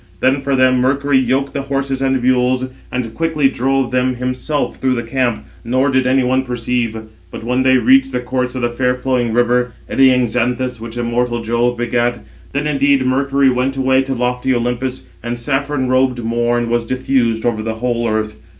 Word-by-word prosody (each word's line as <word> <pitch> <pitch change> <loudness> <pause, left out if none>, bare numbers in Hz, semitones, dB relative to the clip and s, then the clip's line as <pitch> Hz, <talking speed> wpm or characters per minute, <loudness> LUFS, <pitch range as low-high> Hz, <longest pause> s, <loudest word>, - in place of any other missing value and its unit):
Then 135 +2 +2
for 140 0 0
them 130 -1 +3
Mercury 135 +2 +2
yoked 130 +2 0
the 140 - -2
horses 135 -1 -2
and 135 -2 +1
mules, 130 0 +2 0.3
and 120 -3 -3
quickly 160 -4 +1
drove 135 -1 0
them 125 0 +1
himself 130 +4 -2
through 130 -1 0
the 120 - -2
camp, 120 -3 -1 0.2
nor 130 +4 +1
did 130 -1 +2
any 130 0 +3
one 130 +1 +2
perceive. 120 -2 -2 0.3
But - - -8
when 125 +2 0
they 130 0 +4
reached 270 - +4
the - - -1
course 125 0 -2
of 125 - -3
the 120 - +1
fair 125 +1 0
flowing 125 -2 -1
river, 120 +1 +1
eddying 130 -2 +4
Xanthus, 125 +1 -1
which 115 +1 -7
immortal 120 0 -1
Jove 120 +2 0
begat, 120 0 0 0.3
then 140 +2 -2
indeed 140 -2 +2
Mercury 135 +1 +2
went 130 +2 -1
away 130 0 +3
to 135 0 -3
lofty 125 +1 0
Olympus; 125 +2 -2 0.2
and 120 +1 -4
saffron 135 +2 -1
robed 130 -1 +1
Morn 120 +1 0
was 120 0 0
diffused 120 -2 0
over 115 -2 0
the 110 0 -3
whole 120 0 -1
earth. 110 0 -1
125 Hz, 185 wpm, -17 LUFS, 120-135 Hz, 0.3 s, they